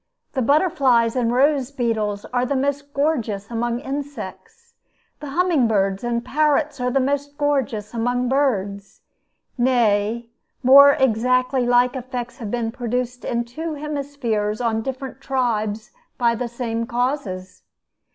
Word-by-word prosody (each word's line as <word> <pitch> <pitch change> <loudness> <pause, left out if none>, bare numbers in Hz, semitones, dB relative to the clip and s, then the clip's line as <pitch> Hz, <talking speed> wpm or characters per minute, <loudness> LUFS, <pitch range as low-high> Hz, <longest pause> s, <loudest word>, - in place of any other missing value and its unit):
The 265 - 0
butterflies 265 -5 +3
and 240 -2 +1
rose 270 +1 +2
beetles 220 -6 -2
are 245 0 +2
the 275 +3 -1
most 285 +1 -1
gorgeous 240 -9 -1
among 235 +1 -1
insects; 290 - -7 0.5
the 295 - -7
humming 325 -4 +2
birds 195 -2 0
and 240 0 -1
parrots 300 -1 +1
are 250 - +1
the 270 - +1
most 285 +2 -1
gorgeous 265 -8 -1
among 245 +2 0
birds. 205 -8 -1 0.6
Nay, 235 -2 +1 0.3
more, 280 +2 +9
exactly 255 0 +2
like 245 +1 +3
effects 250 0 -5
have 220 -4 -5
been 230 0 -2
produced 245 0 -3
in 235 0 -1
two 310 +7 -5
hemispheres 280 -8 -2
on 225 -2 0
different 265 +1 -6
tribes 225 -5 -1 0.3
by 235 -1 +3
the 240 +1 -3
same 230 -1 -3
causes. 235 -8 -3
250 Hz, 130 wpm, -22 LUFS, 230-280 Hz, 0.6 s, more